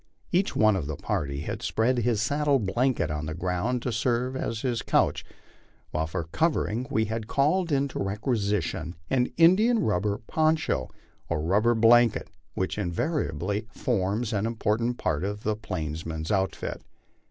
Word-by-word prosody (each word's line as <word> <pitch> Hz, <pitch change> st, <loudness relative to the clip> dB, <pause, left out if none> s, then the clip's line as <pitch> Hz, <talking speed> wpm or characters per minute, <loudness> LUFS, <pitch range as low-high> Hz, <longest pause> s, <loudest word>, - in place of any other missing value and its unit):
Each 185 Hz, +2 st, +1 dB
one 110 Hz, -1 st, +4 dB
of 85 Hz, -7 st, -2 dB
the 75 Hz, -, -3 dB
party 70 Hz, 0 st, -2 dB
had -, -, -4 dB
spread 120 Hz, +3 st, +1 dB
his 115 Hz, -2 st, +1 dB
saddle 145 Hz, +3 st, +2 dB
blanket 115 Hz, -4 st, 0 dB
on 75 Hz, 0 st, -3 dB
the 80 Hz, -, -4 dB
ground 90 Hz, +8 st, -1 dB
to 125 Hz, -, -1 dB
serve 120 Hz, +3 st, 0 dB
as 115 Hz, -4 st, -3 dB
his 120 Hz, -3 st, -1 dB
couch, -, -, +1 dB, 0.7 s
while 80 Hz, +1 st, -1 dB
for 85 Hz, +1 st, -3 dB
covering 125 Hz, -, 0 dB
we 110 Hz, 0 st, +1 dB
had 110 Hz, 0 st, -4 dB
called 160 Hz, +7 st, +1 dB
into 140 Hz, -1 st, 0 dB
requisition 100 Hz, -5 st, -1 dB, 0.2 s
the 125 Hz, -2 st, +2 dB
india 190 Hz, +9 st, +5 dB
rubber 105 Hz, -, +1 dB
poncho 155 Hz, -, +1 dB, 0.4 s
or -, -, 0 dB
rubber 105 Hz, +8 st, +3 dB
blanket 115 Hz, -4 st, +4 dB, 0.2 s
which 95 Hz, +2 st, -2 dB
invariably 100 Hz, -, -1 dB
forms 110 Hz, 0 st, -1 dB
an 105 Hz, +1 st, 0 dB
important 115 Hz, +1 st, 0 dB
part 75 Hz, +1 st, -1 dB
of 105 Hz, +2 st, -3 dB
the 110 Hz, 0 st, 0 dB
plainsman's 80 Hz, -5 st, -4 dB
outfit. 95 Hz, -2 st, -1 dB
110 Hz, 150 wpm, -27 LUFS, 95-125 Hz, 0.7 s, india